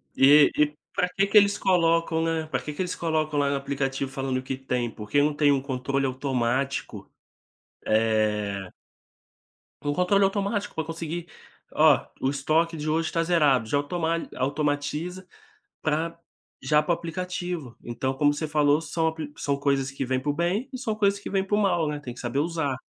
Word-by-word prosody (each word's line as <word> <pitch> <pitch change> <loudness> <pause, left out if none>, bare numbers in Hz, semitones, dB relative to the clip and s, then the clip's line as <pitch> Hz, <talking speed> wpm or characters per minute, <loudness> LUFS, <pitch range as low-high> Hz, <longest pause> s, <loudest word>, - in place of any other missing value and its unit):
e 145 +2 +7
e, 150 0 +3 0.2
pra 180 - +1
que 195 0 +3
que 210 - +4
eles 200 0 +5
colocam, 165 -2 +2
né, 165 -1 -1
pra - - -1
que 150 - -6
que 165 - -4
eles 180 - -2
colocam 155 -3 0
lá 140 -1 +2
no 140 - 0
aplicativo 135 -1 -2
falando 135 -1 -2
o 130 - -4
que 130 0 -4
tem? 125 -3 -2
Porque 110 +6 0
não 150 +1 +2
tem 145 -2 +3
controle 135 0 -1
automático, 130 0 -2 0.8
eh 105 -3 +1 1.2
Um - - +1
controle 180 +4 +3
automático 200 +1 0
pra 160 - -1
conseguir, 165 +1 -5 0.5
oh, - - +6 0.2
o 130 - +2
estoque 155 +4 +1
de 150 0 -3
hoje 160 +1 0
tá 165 - +1
zerado, 150 -9 +3
já 145 - +1
automa 165 +3 -1
automatiza 150 +6 -2 0.6
pra 160 +2 -1 0.4
já 150 0 +3
pro 160 - 0
aplicativo, 175 -5 -5
então 130 +3 -2
como 145 +2 +3
você 155 +1 -3
falou 150 0 +3
são 160 +1 -1
ap 160 - -6 0.2
são 140 -1 -1
coisas 140 -1 0
que 135 0 -4
vêm 130 0 0
pro 145 +1 -1
bem 180 - -1
e 255 - -5
são 230 -4 -2
coisas 200 -1 +2
que - - -7
vêm 195 -1 0
pro 205 +1 0
mal 175 -6 +2
né 150 -1 -4
tem 125 -4 -7
que - - -11
saber 120 +2 -2
usar. 155 -4 -1
150 Hz, 180 wpm, -26 LUFS, 135-170 Hz, 1.2 s, e